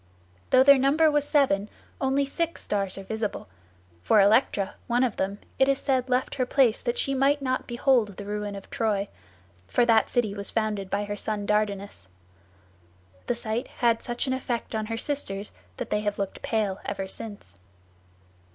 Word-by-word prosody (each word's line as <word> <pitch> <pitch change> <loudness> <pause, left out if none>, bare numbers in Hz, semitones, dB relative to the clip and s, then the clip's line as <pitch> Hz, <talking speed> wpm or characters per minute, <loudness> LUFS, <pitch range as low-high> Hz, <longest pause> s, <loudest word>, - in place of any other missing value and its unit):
Though 255 - +6
their 280 0 +7
number 300 +4 +4
was 295 -1 +1
seven, 215 -9 +2 0.3
only 270 +1 +2
six 335 +4 -3
stars 195 -2 -2
are 195 - -6
visible, 220 - -4 0.5
for 210 - +4
Electra, 200 -1 +3
one 245 +1 +2
of 245 -4 -1
them, 195 +1 -1 0.2
it 265 - +5
is 275 -1 +3
said 260 -2 0
left 250 +1 +1
her 255 - 0
place 250 -5 +3
that 240 -1 -2
she 275 - 0
might 275 +2 +3
not 255 -2 -2
behold 240 -5 +2
the 205 - -7
ruin 205 0 -4
of 195 - -9
Troy, 205 -3 0 0.6
for 240 - +2
that 225 -2 +4
city 230 -5 +1
was 200 0 -5
founded 210 -3 -1
by 205 +1 0
her 205 0 -4
son 205 0 -3
Dardanus. 200 - -1 1.2
The 245 - +1
sight 230 +1 -3
had 235 -2 +1
such 240 +2 -2
an 260 - 0
effect 245 -3 -3
on 220 -1 -2
her 225 0 -3
sisters 210 -7 -3 0.3
that - - -5
they 210 - +2
have 205 -1 -2
looked 195 -1 -4
pale 210 -4 -1
ever 195 -1 -4
since. 195 - -7
220 Hz, 180 wpm, -26 LUFS, 205-260 Hz, 1.2 s, their